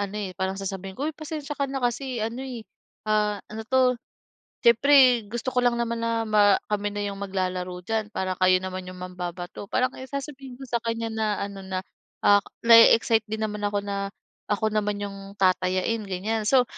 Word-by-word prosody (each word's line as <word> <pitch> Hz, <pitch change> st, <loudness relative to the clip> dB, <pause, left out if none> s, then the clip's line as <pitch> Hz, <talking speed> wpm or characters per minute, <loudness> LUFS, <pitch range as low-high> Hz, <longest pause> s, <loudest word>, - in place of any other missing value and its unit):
ano, 200 Hz, 0 st, -3 dB
eh, 200 Hz, -3 st, -3 dB
parang 190 Hz, +2 st, -2 dB
sasabihin 195 Hz, -1 st, -5 dB
ko, 280 Hz, -, -3 dB
"Uy 315 Hz, -, -1 dB
pasensiya 305 Hz, -1 st, -6 dB
ka 280 Hz, -, +1 dB
na 270 Hz, -1 st, -4 dB
kasi 250 Hz, +2 st, -1 dB
ano, 230 Hz, +3 st, -4 dB
eh, 250 Hz, -4 st, -6 dB, 0.4 s
ah, 210 Hz, -1 st, +1 dB, 0.2 s
ano 220 Hz, -, -5 dB
'to? 260 Hz, -1 st, +4 dB, 0.7 s
Siyempre 245 Hz, -1 st, +6 dB
gusto 240 Hz, +3 st, -3 dB
ko 250 Hz, -, +3 dB
lang 245 Hz, -1 st, +3 dB
naman 235 Hz, -1 st, -1 dB
na 230 Hz, 0 st, 0 dB
ma 205 Hz, -2 st, +5 dB, 0.2 s
kami 205 Hz, 0 st, 0 dB
na 205 Hz, 0 st, -3 dB
yung 200 Hz, -1 st, -5 dB
maglalaro 185 Hz, -2 st, -3 dB
diyan, 220 Hz, 0 st, -1 dB
parang 190 Hz, -3 st, -2 dB
kayo 185 Hz, 0 st, +6 dB
naman 185 Hz, 0 st, -5 dB
yung 185 Hz, -, -10 dB
mambabato." 180 Hz, +1 st, -6 dB
Parang 255 Hz, 0 st, +1 dB
ayon 260 Hz, 0 st, -9 dB
sasabihin 275 Hz, -2 st, -7 dB
ko 270 Hz, -, -8 dB
sa 235 Hz, -2 st, -1 dB
kanya 230 Hz, -1 st, -2 dB
na 220 Hz, -1 st, 0 dB
ano 200 Hz, -1 st, -5 dB
na, 190 Hz, 0 st, -4 dB, 0.4 s
ah, 205 Hz, 0 st, +7 dB, 0.2 s
na-e-excite 230 Hz, -1 st, +7 dB
din 220 Hz, 0 st, -2 dB
naman 210 Hz, -1 st, -5 dB
ako 205 Hz, 0 st, -2 dB
na, 200 Hz, -1 st, -3 dB, 0.4 s
ako 215 Hz, +1 st, 0 dB
naman 210 Hz, -1 st, 0 dB
yung 195 Hz, 0 st, -8 dB
tatayain, 185 Hz, +3 st, +2 dB
ganyan. 210 Hz, +4 st, -2 dB
So, 255 Hz, +1 st, +5 dB
215 Hz, 190 wpm, -25 LUFS, 195-235 Hz, 0.7 s, ah